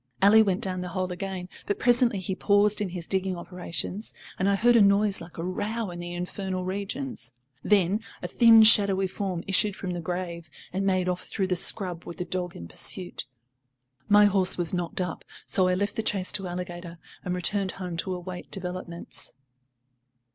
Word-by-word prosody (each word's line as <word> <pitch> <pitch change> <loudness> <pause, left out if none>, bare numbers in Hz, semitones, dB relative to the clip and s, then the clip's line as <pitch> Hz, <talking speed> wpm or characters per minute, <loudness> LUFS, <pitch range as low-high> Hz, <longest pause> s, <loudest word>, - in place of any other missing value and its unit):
Ally 210 +3 +7
went 195 -1 +1
down 185 -4 -1
the 180 - -5
hole 185 0 -1
again, 180 0 -5 0.2
but 205 - -1
presently 240 -3 +3
he 190 +1 -3
paused 205 +2 +3
in 200 - -1
his 175 -2 -5
digging 190 0 -1
operations, 180 +3 -3 0.2
and 190 +2 +2
I 200 - +3
heard 240 +4 +4
a 230 - +6
noise 200 0 +3
like 170 0 -12
a 165 - -4
row 205 +3 -3
in 175 - -8
the 175 0 -6
infernal 185 +1 -4
regions. 200 - -4 0.3
Then 200 +1 +2 0.2
a - - -2
thin 225 +3 +7
shadowy 200 -3 +6
form 185 -2 -4
issued 195 +1 +2
from 185 - -5
the 175 -1 -4
grave 170 -1 -5 0.2
and 195 +1 -1
made 185 -1 +1
off 180 0 -3
through 195 - -1
the 185 -1 0
scrub 180 -1 +1
with 170 - -8
the 180 - -3
dog 180 -1 -4
in 85 - -8
pursuit. 175 - 0 0.8
My 205 0 +7
horse 190 -2 +4
was 175 -1 +2
knocked 175 0 -2
up, 180 -2 -4 0.2
so 185 -2 +1
I 180 - +2
left 200 +2 -2
the - - +1
chase 195 -4 -1
to 195 -3 -2
Alligator 175 -1 -6 0.3
and 180 -1 -2
returned 190 +2 0
home 180 -3 -6
to 185 +2 -2
await 180 0 -8
developments. 180 -2 -4
185 Hz, 190 wpm, -26 LUFS, 180-200 Hz, 0.8 s, Ally